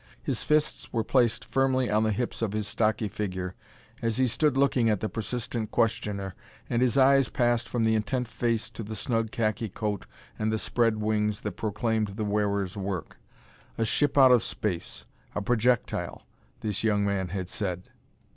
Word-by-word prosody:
His - - -2
fists 150 0 0
were 115 -2 0
placed 120 -3 +2
firmly 130 -1 +2
on 105 +1 +3
the 110 0 +2
hips 120 +3 -2
of 110 -3 -1
his 105 -1 -2
stocky 110 0 +1
figure 95 -3 -4 0.5
as 115 -2 0
he 130 - +4
stood 135 +3 +1
looking 135 -4 +3
at 105 -3 +2
the 110 - -1
persistent 115 0 -3
questioner, 100 -4 0 0.3
and 120 0 0
his 130 +1 +2
eyes 135 -1 +5
passed 120 -1 +1
from 120 -2 0
the 110 0 +3
intent 125 +3 0
face 115 0 -1
to - - -7
the 110 0 -5
snug 115 -1 -1
khaki 110 0 -1
coat 105 0 -3 0.3
and 110 0 +1
the 110 - +1
spread 115 0 +1
wings 105 -1 0
that - - -3
proclaimed 110 -1 -1
the 110 0 -2
wearer's 100 -2 0
work. 95 -4 -4 0.6
A 115 - +1
ship 145 +6 +1
out 130 -2 +8
of 125 -2 +6
space 95 -6 -3 0.3
a - - 0
projectile 120 +1 0 0.4
this 105 -2 -2
young 105 -2 +2
man 100 -2 0
had 90 0 -4
said. 90 -2 -4
110 Hz, 175 wpm, -28 LUFS, 105-120 Hz, 0.6 s, out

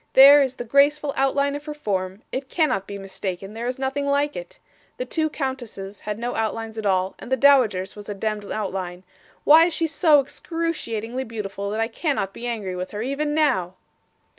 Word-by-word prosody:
There 280 +2 +9
is 260 -2 0
the 240 - -5
graceful 280 +4 +3
outline 280 +1 +1
of 290 +1 -7
her 300 -1 -5
form; 195 -7 -3
it 265 0 -4
cannot 295 - +1
be 200 - -6
mistaken 195 0 -5
there 230 +2 -4
is 250 - -2
nothing 270 +2 -2
like 285 +1 +1
it. - - -8 0.4
The - - -3
two 315 -7 0
countesses 240 -9 -5
had 210 -1 -4
no 240 +2 -3
outlines 225 0 -3
at 210 - -2
all, 190 0 +1
and 245 - -10
the 260 - +3
dowager's 235 -9 +4
was 205 0 -10
a 205 - -3
demd 210 0 -3
outline. 190 -3 -4 0.4
Why 320 +3 +8
is 340 -2 0
she 330 - +1
so 315 -1 +4
excruciatingly 265 -6 -3
beautiful 200 -3 -5
that 215 +2 -3
I 225 - +1
cannot 225 - -2
be 240 - -6
angry 210 -6 -3
with 180 +1 -4
her, 210 +1 -4
even 295 +3 -1
now? 215 - +1
240 Hz, 195 wpm, -23 LUFS, 200-285 Hz, 0.4 s, There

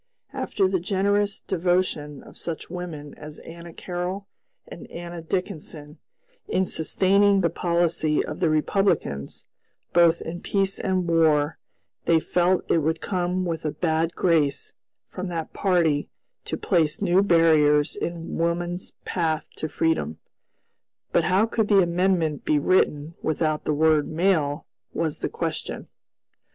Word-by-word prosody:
After 195 -2 0
the 185 -1 0
generous 200 +2 0
devotion 175 -5 -1
of - - -15
such 165 -1 -6
women 165 -5 -6
as 150 0 -9
Anna 170 +1 -10
Carroll 180 +4 -5 0.4
and - - -10
Anna 170 0 -7
Dickinson 160 -4 -5 0.5
in 190 - +1
sustaining 195 +4 +3
the 170 -3 +1
policy 170 -3 +1
of - - -6
the 170 - +2
Republicans, 155 - 0 0.5
both 170 -1 +5
in 175 +2 -6
peace 195 -1 0
and 185 -2 0
war, 160 -2 +2 0.5
they 165 -1 +4
felt 180 +3 +1
it 165 - +4
would 160 +1 0
come 185 -1 -1
with 165 -2 -3
a 155 - 0
bad 160 +1 -1
grace 155 -6 +1 0.3
from 185 +1 -6
that 165 -2 -4
party 170 -6 +1 0.4
to - - -3
place 165 -6 +1
new 190 -1 +3
barriers 155 -5 +4
in 170 -4 -4
woman's 175 +2 -2
path 160 -3 -1
to 155 - -3
freedom. 145 - 0 0.9
But - - +2
how 190 +4 +3
could 220 -1 0
the 200 -2 +5
amendment 170 -3 +1
be 150 - +2
written 150 -1 +1
without 155 -1 -1
the 150 - +1
word 155 -1 +3
"male," 155 -3 +1 0.3
was 160 -2 -1
the - - -2
question. - - -4
170 Hz, 135 wpm, -24 LUFS, 155-185 Hz, 0.9 s, both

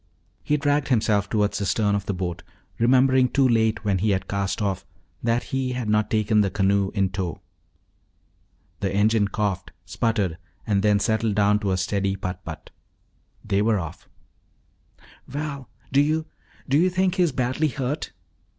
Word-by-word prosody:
He 150 - +1
dragged 145 0 +1
himself 105 -5 +1
toward 105 -2 +1
the - - -2
stern 105 +1 +1
of 100 -1 -2
the 100 - 0
boat, 90 -1 -3 0.4
remembering 130 +1 +4
too 135 0 +3
late, 110 -2 +1
when 100 -3 +1
he 105 +4 +1
had 95 -1 0
cast 100 0 -2
off, 100 -3 -1 0.4
that 115 +1 +1
he 130 -1 0
had 125 -3 -3
not 105 0 +2
taken 110 -1 +2
the 100 - +1
canoe 100 0 +1
in 95 -2 +2
tow. 90 -3 -3 1.4
The 95 -2 -1
engine 105 +1 +3
coughed, 100 -3 -2
sputtered, 100 -3 -1 0.3
and 100 -2 +1
then 105 0 +3
settled 110 0 0
down 105 0 +3
to 100 -2 -1
a 95 - +1
steady 95 +1 0
putt 90 -1 -5
putt. 80 -2 -9 0.7
They 100 +1 +1
were 110 0 +2
off. 85 -1 -8 1.2
"Val, 140 -1 -5 0.2
do 140 - +5
you 155 +2 +1 0.4
do 140 +3 +3
you 180 +3 +4
think 185 0 +1
he - - +3
is 175 -3 +3
badly 130 +4 0
hurt?" 140 +2 -3
105 Hz, 170 wpm, -24 LUFS, 100-130 Hz, 1.4 s, do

